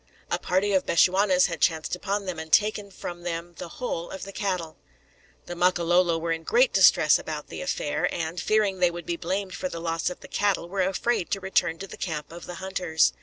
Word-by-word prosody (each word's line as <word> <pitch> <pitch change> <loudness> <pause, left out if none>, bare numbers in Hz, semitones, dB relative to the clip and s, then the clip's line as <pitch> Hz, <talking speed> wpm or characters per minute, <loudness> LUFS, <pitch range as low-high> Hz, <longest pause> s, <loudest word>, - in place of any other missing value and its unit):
A - - +1
party 195 +3 +1
of 190 - +2
Bechuanas 185 +2 +4
had 165 -4 -4
chanced 160 0 +1
upon 200 +2 -2
them, 180 -3 -4
and 160 0 -8
taken 210 0 +3
from 175 -2 -7
them 175 0 -4
the - - -5
whole 170 -9 -3
of 190 - -7
the 195 - -7
cattle! 180 -6 -3 0.7
The 175 - -6
Makololo 175 -1 +3
were 165 0 -2
in 165 0 -1
great - - +3
distress - - +6
about - - -6
the - - -6
affair, - - -1
and, 165 +1 -3
fearing 210 -3 +1
they 180 -1 +4
would 170 -1 -7
be 170 - -2
blamed 185 +3 -3
for 275 +7 -3
the 165 - -6
loss 165 0 -1
of 180 - -9
the - - -11
cattle, 200 -4 0
were 190 +2 -2
afraid 190 +2 0
to 195 - -1
return 180 -3 +1
to 195 - -7
the - - -10
camp 155 -4 -4
of 170 +1 -10
the 180 - -6
hunters. 175 - +1
180 Hz, 220 wpm, -26 LUFS, 170-195 Hz, 0.7 s, distress